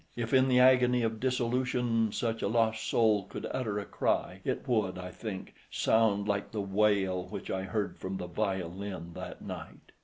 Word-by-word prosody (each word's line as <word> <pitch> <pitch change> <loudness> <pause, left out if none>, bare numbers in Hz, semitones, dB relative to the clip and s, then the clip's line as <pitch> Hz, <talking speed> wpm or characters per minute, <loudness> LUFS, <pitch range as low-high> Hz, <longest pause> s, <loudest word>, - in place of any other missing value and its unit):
If 115 0 -3
in 130 0 +5
the 125 -1 +4
agony 125 -1 +5
of 110 -1 -1
dissolution 125 -2 +1
such 115 +1 -2
a - - +1
lost 110 0 +1
soul 110 -4 +3
could - - -7
utter 115 -6 -2
a 100 - -3
cry, - - -1
it - - -2
would, 105 -7 +1
I 90 0 -6
think, 100 -1 -6 0.2
sound 105 -2 +2
like 100 -1 -1
the 110 - -3
wail 100 -2 +1
which - - -6
I 95 - -1
heard 100 +2 -3
from 95 +1 -4
the 90 - -4
violin 95 -2 -3
that - - -8
night. - - -9
110 Hz, 180 wpm, -30 LUFS, 95-120 Hz, 0.2 s, in